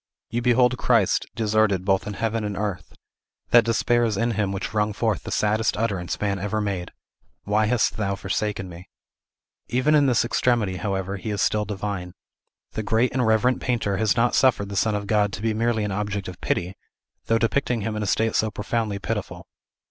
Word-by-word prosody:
You 120 +2 -1
behold 125 +1 +3
Christ 115 -6 +2
deserted 110 -4 +1
both 95 0 +1
in 105 - -4
heaven 115 +1 -1
and 105 -2 -3
earth; 95 -6 -4 0.6
that 120 -1 +7
despair 115 +2 +2
is 110 -4 0
in 115 +3 +1
him 100 -3 -1
which 100 +2 -4
wrung 105 0 +1
forth 110 -1 0
the - - -8
saddest 110 +1 +1
utterance 100 -6 -2
man 100 -2 -1
ever 105 +3 -2
made, 100 -4 -3 0.5
"Why 105 +1 +1
hast 120 0 +1
Thou 100 -2 -1
forsaken 100 0 -2
me?" 90 0 -11 0.8
Even 130 +5 +2
in 145 -2 +5
this 120 -2 +3
extremity, 115 -6 +1
however, 95 +1 -2
he 110 - -6
is 105 -1 -2
still 105 0 +1
divine. 100 -3 -4 0.6
The - - -3
great 110 +4 +1
and 125 -3 +1
reverent 115 +3 +2
painter 115 -6 0
has 110 +1 +1
not 120 +1 +3
suffered 115 -6 +3
the 100 - -5
Son 105 +1 +1
of 100 0 -3
God 105 -1 +2
to - - -5
be 115 -1 +1
merely 110 0 0
an 105 - -2
object 100 0 -3
of 90 -2 -9
pity, 90 +2 -1 0.5
though 115 - +3
depicting 120 +1 0
him 110 +1 -3
in 105 - -3
a 105 - -2
state 110 +3 +1
so 110 - +2
profoundly 105 0 -2
pitiful. 100 - -4
105 Hz, 195 wpm, -24 LUFS, 100-115 Hz, 0.8 s, that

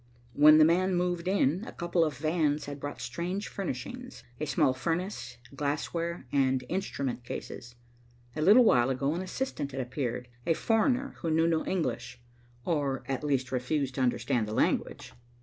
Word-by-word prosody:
When 150 +4 +8
the 155 - +7
man 185 +3 +2
moved 175 0 -1
in, 185 -1 +2
a - - -6
couple 175 0 0
of 150 -4 -2
vans 155 -1 0
had 145 0 -7
brought 145 +1 -6
strange 180 +10 -3
furnishings, 200 - -6 0.2
a 155 - -2
small 140 -1 +3
furnace, 165 -3 -3 0.2
glassware 160 +3 -2
and 130 -2 +2
instrument 140 -9 -3
cases. 120 0 -7 0.6
A 155 - -2
little 210 +10 +7
while 125 - +4
ago 135 +3 0
an 175 - -3
assistant 185 - -4
had 135 - -4
appeared, 125 -1 -3 0.2
a 165 - +3
foreigner 245 - +1
who 165 - -2
knew 160 +1 +3
no 165 -1 +1
English, 120 -8 -2 0.5
or 145 -5 -1
at 135 +1 -2
least 130 -3 0
refused 130 +2 -1
to 130 - -3
understand 120 -2 +1
the 105 - -4
language. - - 0
150 Hz, 165 wpm, -29 LUFS, 130-175 Hz, 0.6 s, When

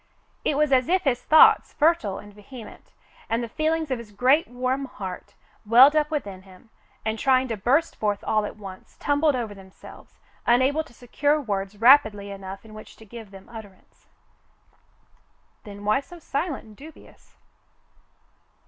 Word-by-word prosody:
It 285 - 0
was 300 -1 +2
as 255 +1 +3
if 370 +1 +2
his 250 -3 0
thoughts, 310 +4 +5
fertile 295 - +1
and 205 0 -12
vehement, 210 +2 -13 0.4
and 230 +1 -1
the - - -4
feelings 315 +3 -1
of 255 - -1
his 225 -3 -11
great, 255 +9 +2
warm 255 +2 -2
heart 190 -7 -8 0.3
welled 250 +7 +7
up 300 -1 +2
within 205 - -4
him, 190 +4 -19 0.3
and, 220 0 -2
trying 260 -1 +2
to 225 - -2
burst 265 +11 +1
forth 205 -1 -2
all 215 -1 +1
at - - -11
once, 195 -3 -12
tumbled 290 0 +1
over 230 -4 -4
themselves, 190 -1 -15 0.3
unable 260 +6 +3
to - - -19
secure 290 +5 0
words 200 -5 -4
rapidly 220 -5 +4
enough 195 +1 -9
in 215 - -14
which 215 - -12
to 220 - -16
give 225 0 -11
themselves 195 +4 -14
utterance. 200 -3 -18 1.6
"Then 205 -1 -10
why 215 +4 +3
so 345 +5 -13
silent 290 -1 -4
and 215 -1 -16
dubious. 300 +6 -16
235 Hz, 160 wpm, -24 LUFS, 205-285 Hz, 1.6 s, welled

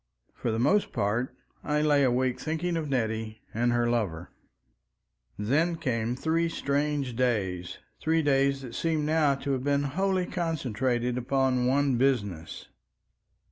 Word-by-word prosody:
For - - -3
the 110 - 0
most 190 - +2
part 115 +6 0 0.3
I 150 0 +1
lay 145 -2 +4
awake 130 0 +1
thinking 165 +2 -2
of 155 -3 -2
Nettie 110 -3 -2
and 120 +2 +1
her 120 0 +2
lover. 100 -9 -1 1.1
Then 155 +11 +1
came 120 -7 -1
three 165 +4 0
strange 145 -4 -1
days—three 115 - -1
days 140 -1 +2
that 120 -3 -8
seem 160 0 0
now 155 -2 +3
to 140 +1 -3
have 130 -2 -1
been 140 0 +1
wholly 185 +6 0
concentrated 125 - -1
upon 130 0 +1
one 135 -1 +2
business. 105 -11 -1
135 Hz, 135 wpm, -28 LUFS, 120-150 Hz, 1.1 s, lay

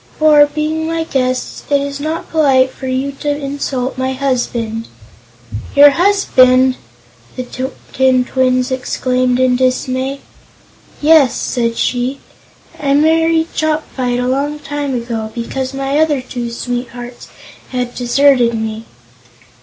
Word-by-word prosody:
For, 300 -1 +6
being 310 +2 -2
my 330 0 -1
guests, 255 -4 -2
it 285 -1 +3
is 280 0 -4
not 315 +3 -4
polite 270 -5 +3
for 265 - -8
you 260 +2 -1
to 295 - -2
insult 275 -3 -3
my 260 0 -1
husband." 240 -4 -2 0.9
"Your 285 0 +8
husband!" 260 -8 +3 0.6
the 255 - -4 0.5
tin 260 -1 +3
twins 255 0 +1
exclaimed 255 -1 0
in 255 -1 +3
dismay. 260 +1 -1 0.8
"Yes," 300 -5 +5
said 230 -2 -2
she. 255 +2 -1 0.6
"I 280 -1 +1
married 325 +2 +2
Chopfyt 300 -6 -1
a 250 - -1
long 280 +3 -1
time 290 -2 -4
ago, 230 -2 -4
because 260 +2 -4
my 275 +1 -1
other 310 -3 +2
two 245 -2 -5
sweethearts 245 0 -6 0.4
had 250 -1 -3
deserted 245 -1 +3
me." 220 0 -4
260 Hz, 120 wpm, -15 LUFS, 250-290 Hz, 0.9 s, Your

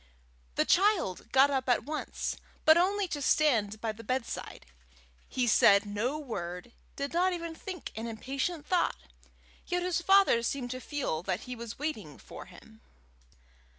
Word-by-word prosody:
The - - +2
child 380 - +2
got 270 +2 +5
up 265 -2 -1
at 245 - +3
once, 305 +1 -4 0.3
but 315 - +8
only 385 +3 +2
to 295 -3 -3
stand 230 -8 +2
by 225 0 -2
the 220 +2 -11
bed 255 +2 -1
side. - - -7 0.6
He 255 - 0
said 200 -2 +5
no 215 +8 -2
word, 195 - -6 0.2
did 280 +1 -4
not 365 +2 +2
even 335 -1 -5
think 365 +2 -7
an 225 +1 -4
impatient 275 +8 -3
thought, 360 +1 +1 0.7
yet 355 0 -1
his 360 -1 0
father 385 -9 +5
seemed 245 +1 -3
to 255 0 -5
feel 275 - -2
that 185 0 -2
he 250 -1 -7
was 235 -1 -8
waiting 225 - -4
for - - -11
him. 220 +5 -16
265 Hz, 160 wpm, -30 LUFS, 220-330 Hz, 0.7 s, but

